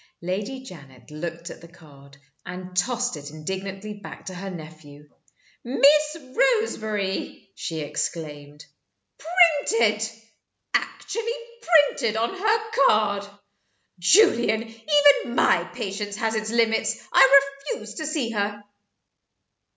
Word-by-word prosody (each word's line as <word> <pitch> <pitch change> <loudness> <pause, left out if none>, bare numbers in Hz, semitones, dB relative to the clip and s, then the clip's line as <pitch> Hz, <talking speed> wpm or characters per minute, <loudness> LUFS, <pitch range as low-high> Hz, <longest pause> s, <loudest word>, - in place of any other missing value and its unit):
Lady 205 +9 -4
Janet 140 - -14
looked 170 +2 -6
at - - -12
the 170 - -12
card, 140 -5 -18 0.3
and 180 0 -8
tossed 245 +4 0
it 145 0 -9
indignantly 190 +6 -6
back 205 0 -11
to 185 - -6
her 195 +2 -6
nephew. 155 -4 -11 0.6
"Miss 300 +5 +4
Roseberry!" 220 - -1
she 160 -2 -5
exclaimed. 150 -1 -5 0.5
"Printed 285 - +3 0.7
actually 460 +2 -2 0.3
printed 290 - +3
on 230 +11 -1
her 435 +3 0 0.2
card! 205 -2 +1 0.7
Julian, 230 - +4
even 250 +3 +3
MY 175 - +3
patience 205 -3 -4
has 220 +1 -1
its 215 0 -2
limits. 230 -1 +1 0.2
I 270 +1 +8 0.4
refuse 215 -1 -9
to 310 +7 -5
see 285 -7 -2
her!" 205 -1 -3
215 Hz, 110 wpm, -24 LUFS, 175-265 Hz, 0.7 s, I